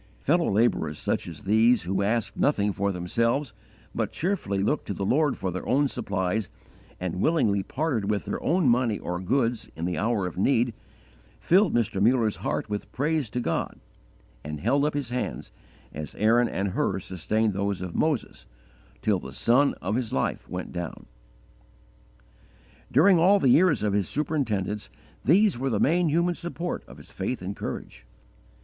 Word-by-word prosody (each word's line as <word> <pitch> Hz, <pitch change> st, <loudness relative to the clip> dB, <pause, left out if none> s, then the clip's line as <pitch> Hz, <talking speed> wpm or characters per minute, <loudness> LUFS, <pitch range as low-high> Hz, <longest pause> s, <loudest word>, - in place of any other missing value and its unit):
_ -, -, -29 dB
Fellow 170 Hz, +4 st, +2 dB
labourers 100 Hz, -8 st, +1 dB
such -, -, -2 dB
as 80 Hz, -3 st, -9 dB
these, 110 Hz, +4 st, +4 dB
who 95 Hz, +3 st, -1 dB
asked 110 Hz, +2 st, 0 dB
nothing 105 Hz, -8 st, +1 dB
for 100 Hz, +1 st, 0 dB
themselves, 115 Hz, +8 st, -1 dB, 0.4 s
but -, -, -2 dB
cheerfully 125 Hz, -, -1 dB
looked 145 Hz, +8 st, 0 dB
to 100 Hz, -, -3 dB
the 100 Hz, -, -3 dB
Lord 145 Hz, +5 st, +2 dB
for 95 Hz, -, -2 dB
their 90 Hz, -, -5 dB
own 140 Hz, +3 st, +3 dB
supplies, 105 Hz, -5 st, -2 dB, 0.5 s
and 90 Hz, 0 st, -3 dB
willingly 115 Hz, -12 st, +2 dB
parted 130 Hz, -4 st, -2 dB
with 105 Hz, -1 st, -1 dB
their -, -, -3 dB
own 170 Hz, -3 st, +2 dB
money 120 Hz, -3 st, +2 dB
or 90 Hz, 0 st, -4 dB
goods 120 Hz, +4 st, 0 dB
in 80 Hz, +2 st, -4 dB
the 90 Hz, -3 st, -2 dB
hour 110 Hz, -2 st, 0 dB
of 90 Hz, 0 st, -5 dB
need, 120 Hz, +1 st, +2 dB, 0.7 s
filled 185 Hz, -, +3 dB
Mr. 110 Hz, -4 st, 0 dB
Muller's 115 Hz, -1 st, +3 dB
heart -, -, -2 dB
with 105 Hz, -1 st, -5 dB
praise 150 Hz, -2 st, 0 dB
to 125 Hz, -, -3 dB
God, 85 Hz, -9 st, -2 dB, 0.6 s
and 75 Hz, 0 st, -5 dB
held 140 Hz, +7 st, +2 dB
up 150 Hz, -, -1 dB
his 140 Hz, -4 st, -3 dB
hands, 125 Hz, 0 st, -4 dB, 0.4 s
as 75 Hz, -1 st, -7 dB
Aaron 115 Hz, +3 st, +3 dB
and 100 Hz, +1 st, -1 dB
Hur 95 Hz, -, 0 dB
sustained 100 Hz, +4 st, -1 dB
those 100 Hz, 0 st, -1 dB
of 90 Hz, -2 st, -6 dB
Moses, 155 Hz, -7 st, -1 dB, 0.6 s
till 105 Hz, -3 st, +2 dB
the 65 Hz, -, -9 dB
sun 120 Hz, -, +3 dB
of 95 Hz, +3 st, -1 dB
his 120 Hz, -1 st, -1 dB
life 65 Hz, -, -2 dB
went 90 Hz, 0 st, -5 dB
down. 85 Hz, -3 st, -6 dB, 1.9 s
During 170 Hz, +6 st, +5 dB
all 190 Hz, +5 st, +6 dB
the 135 Hz, -, +2 dB
years 155 Hz, -2 st, +4 dB
of 105 Hz, -2 st, +1 dB
his 100 Hz, -1 st, 0 dB
superintendence 110 Hz, -, -2 dB, 0.3 s
these 185 Hz, -, +4 dB
were 135 Hz, +1 st, 0 dB
the 110 Hz, -5 st, 0 dB
main 170 Hz, +2 st, +3 dB
human 170 Hz, +3 st, +2 dB
support 175 Hz, +1 st, -4 dB
of -, -, -13 dB
his -, -, -15 dB
faith 95 Hz, +2 st, -3 dB
and 100 Hz, +2 st, -4 dB
courage. -, -, -7 dB
115 Hz, 170 wpm, -26 LUFS, 95-140 Hz, 1.9 s, all